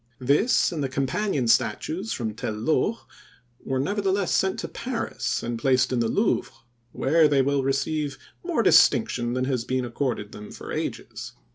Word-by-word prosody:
This 145 - +2
and 155 -4 -3
the 135 - -1
companion 135 - -1
statues 130 - +1
from 110 -3 -3
Tel 110 0 -4
Loh, 155 - 0 0.6
were 130 -1 -1
nevertheless 195 +4 0
sent 190 0 +1
to - - -4
Paris 250 0 -3
and 120 -1 -3
placed 130 0 +2
in 125 - +1
the 115 - +1
Louvre, 210 - 0 0.4
where 155 +5 +3
they 140 -2 +3
will 140 0 +1
receive 140 +1 -1 0.3
more - - 0
distinction 120 -1 +4
than 130 0 0
has 130 -3 -1
been 130 +1 -1
accorded 120 -4 -3
them 105 0 -10
for - - -9
ages. - - -5
135 Hz, 160 wpm, -25 LUFS, 120-160 Hz, 0.6 s, distinction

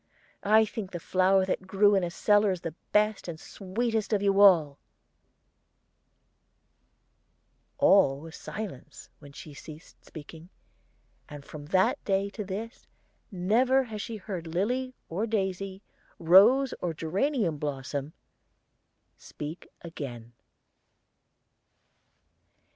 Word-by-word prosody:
I 220 +2 +4
think 210 -2 -6
the 175 - -6
flower 190 +2 +2
that 185 0 -3
grew 205 +2 +4
in 195 -2 +2
a 175 - -1
cellar 205 +2 +2
the 170 -3 -7 0.2
best 210 -1 +1
and 165 -2 -6
sweetest 220 +5 -3
of 200 -1 +1
you 200 0 +3
all." 160 -8 +5 3.0
All 135 0 +4
was 160 +2 -11
silence 165 -10 -8
when 145 -2 -13
she 145 +1 -11
ceased 155 +3 -13
speaking, 160 +2 -12 0.8
and 145 -2 -10
from 145 -1 -10
that 185 +3 +1
day 200 0 0
to 210 - -5
this 205 +5 -7 0.4
never 235 +8 +2
has 220 -4 -7
she 230 0 -6
heard 185 -5 -6
lily 250 +10 -2
or 200 +7 -2
daisy, 195 -2 -3 0.3
rose 210 +11 +5
or 170 -2 -2
geranium 190 - -1
blossom, 140 0 -4 1.0
speak 150 +4 -8
again. 120 -8 -8
190 Hz, 110 wpm, -28 LUFS, 160-210 Hz, 3.0 s, all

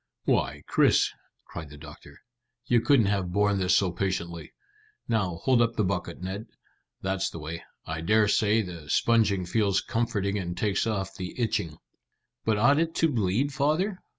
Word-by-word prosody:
"Why, - - 0
Chris," - - +3 0.3
cried 80 -3 -8
the 75 - -12
doctor, 75 -1 -13 0.4
"you 120 -2 +3
couldn't 135 -4 +4
have 100 -3 0
borne 100 +1 +2
this 90 -1 +3
so 95 -3 +1
patiently. 85 -2 -3 0.6
Now, 100 -7 0
hold 130 -3 +4
up 115 0 +1
the 110 - +1
bucket, 90 -2 -3
Ned. 100 +5 -5 0.6
That's 95 0 -1
the - - -9
way. 80 +2 -6 0.2
I 80 +1 -4
dare 105 +5 +3
say 110 +2 +3
the 85 -5 -9
sponging 105 -3 +2
feels 100 +1 +1
comforting 105 -4 -1
and 90 -2 -5
takes 105 +3 0
off 95 -3 -2
the 95 +5 -7
itching." 105 -9 -1 0.7
"But 110 -1 +1
ought 140 +7 +4
it 165 0 -1
to 165 - +3
bleed, 120 +3 0
father?" 155 +8 0
100 Hz, 165 wpm, -27 LUFS, 90-115 Hz, 0.7 s, couldn't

